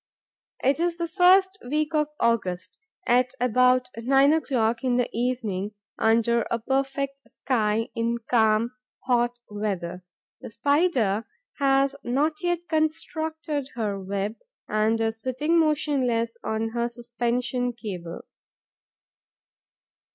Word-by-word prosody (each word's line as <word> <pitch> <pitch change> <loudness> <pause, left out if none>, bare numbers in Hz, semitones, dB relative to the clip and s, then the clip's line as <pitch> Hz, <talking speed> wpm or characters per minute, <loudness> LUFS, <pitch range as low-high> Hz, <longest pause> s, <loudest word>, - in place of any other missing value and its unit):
It 275 +4 +3
is 340 0 0
the 340 0 -2
first 375 +2 +4
week 300 +5 -1
of 300 -1 +2
August, 185 -5 0 0.3
at 250 +1 +2
about 250 +1 +3
nine 270 +5 +4
o'clock 240 -7 0
in 250 -2 +2
the 245 - +2
evening, 220 -5 -2 0.2
under 230 +1 +3
a 235 - +1
perfect 275 +3 -2
sky, 225 -3 0
in 230 +1 0
calm, 220 0 +3 0.3
hot 240 -1 +1
weather. 185 -4 -3 0.4
The - - -8
Spider 240 - +1 0.3
has 275 0 +3
not 295 +6 0
yet 350 -1 -1
constructed 315 -2 -2
her 210 -4 -2
web 200 +3 -3 0.3
and 215 +1 +1
is 225 0 -1
sitting 300 +6 +1
motionless 265 -7 +1
on 220 +1 -1
her 235 +1 -1
suspension 240 +1 -2
cable. 180 -8 -6
245 Hz, 115 wpm, -25 LUFS, 225-285 Hz, 0.4 s, first